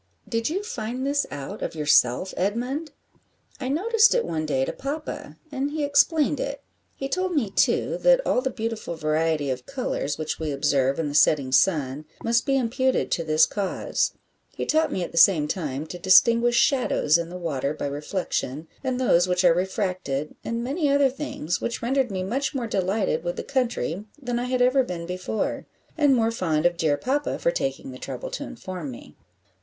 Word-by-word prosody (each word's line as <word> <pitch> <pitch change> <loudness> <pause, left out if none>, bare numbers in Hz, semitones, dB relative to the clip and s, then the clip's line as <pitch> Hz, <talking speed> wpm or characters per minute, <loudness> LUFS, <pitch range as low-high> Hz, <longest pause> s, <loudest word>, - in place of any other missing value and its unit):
"Did 230 +1 -1
you 380 +6 -2
find 250 - -4
this 285 +1 +1
out 140 -2 -7
of - - -4
yourself, 150 +1 +3
Edmund?" 250 - -2 0.7
"I 255 - -3
noticed 440 - +4
it - - +1
one 155 -1 -2
day 135 -3 +1
to - - -4
papa, 290 +3 -6
and 275 0 -1
he 300 0 -2
explained 290 0 +3
it; 280 0 -4 0.3
he 270 - -4
told 370 +5 -1
me, 230 -10 0
too, - - +1
that - - +5
all 250 - +2
the 265 - -1
beautiful 225 -7 -4
variety 155 -2 0
of 125 -1 -5
colours 245 - -2
which 155 0 -3
we 160 -1 -2
observe 140 -1 +1
in 160 - 0
the 145 - -4
setting 140 -2 +4
sun 145 -1 +2 0.2
must 235 +1 +1
be 270 0 +3
imputed 260 +1 0
to 165 - 0
this 155 0 +4
cause; 200 -3 -1 0.4
he - - -3
taught 315 -1 +2
me 185 - -1
at - - -6
the 170 - +1
same 160 -5 +6
time 150 -4 -3
to 175 +2 -8
distinguish 230 +7 +5
shadows 235 - +3
in 170 0 -4
the 180 - -7
water 145 -6 -2
by 150 - -4
reflection, 150 0 -3 0.2
and 260 -1 -1
those 180 -8 +3
which 180 0 +1
are 170 - +7
refracted, 180 - -2
and 230 +1 -3
many 285 +4 0
other 280 -1 +4
things, 250 - -3
which 235 - -3
rendered 260 +1 +1
me 190 -2 -3
much 265 +9 -2
more 250 -3 -1
delighted 190 -5 0
with 175 0 -2
the - - -5
country 235 - -1
than 245 -3 -2
I 245 - -2
had 250 0 +1
ever 255 +2 +4
been 175 -8 -4
before, 185 +4 -3 0.3
and 290 -4 +4
more 225 -1 +2
fond 165 -7 0
of 175 0 +3
dear 155 -3 +1
papa 280 - -1
for 170 - +1
taking 135 -3 -3
the 130 - -10
trouble 130 -2 -6
to 285 - -4
inform 185 - -7
me." 115 -11 -11
195 Hz, 190 wpm, -25 LUFS, 155-265 Hz, 0.7 s, are